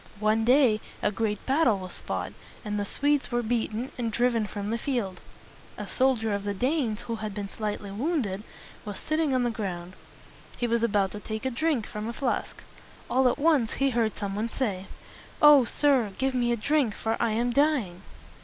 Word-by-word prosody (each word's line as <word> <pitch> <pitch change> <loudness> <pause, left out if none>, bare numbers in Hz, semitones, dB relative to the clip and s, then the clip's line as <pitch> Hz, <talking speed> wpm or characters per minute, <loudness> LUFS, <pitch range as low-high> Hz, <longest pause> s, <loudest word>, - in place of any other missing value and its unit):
One 215 +1 +2
day 245 -4 +5 0.2
a - - +2
great 210 -1 -2
battle 265 -6 +3
was 185 -2 -7
fought, - - -4 0.3
and 210 0 -2
the 205 - -1
Swedes 285 +5 0
were 240 0 0
beaten, 230 +1 -1
and 230 -2 -1
driven 235 -1 +1
from 205 +1 -4
the 230 - -1
field. 230 -10 -2 0.6
A - - -5
soldier 245 -5 +1
of 200 0 -2
the 205 0 -2
Danes 250 -2 0
who 230 -2 -4
had 215 -2 -5
been 205 -1 -3
slightly 210 0 -4
wounded 220 - -1 0.4
was 205 -3 -6
sitting 310 -3 0
on 255 - +2
the 240 - +1
ground. 185 -5 -5 0.6
He 245 - -1
was 235 -1 +1
about 205 -4 +2
to 210 - -6
take 220 +3 -5
a 260 - 0
drink 275 -3 0
from 210 -1 -5
a 235 - -3
flask. 255 0 -2 0.5
All 260 +1 +4
at - - -1
once 290 -7 +3
he 275 0 +1
heard 230 -3 0
some 200 -1 -3
one 220 +3 -1
say, 200 -7 -2 0.5
"O 295 -4 +8
sir! 255 -5 +2
give 265 0 0
me 240 -1 +1
a 235 - +1
drink, 270 -1 +1
for 225 0 -1
I 230 -2 +1
am 240 +2 +1
dying." 255 - +1
230 Hz, 195 wpm, -27 LUFS, 210-260 Hz, 0.6 s, O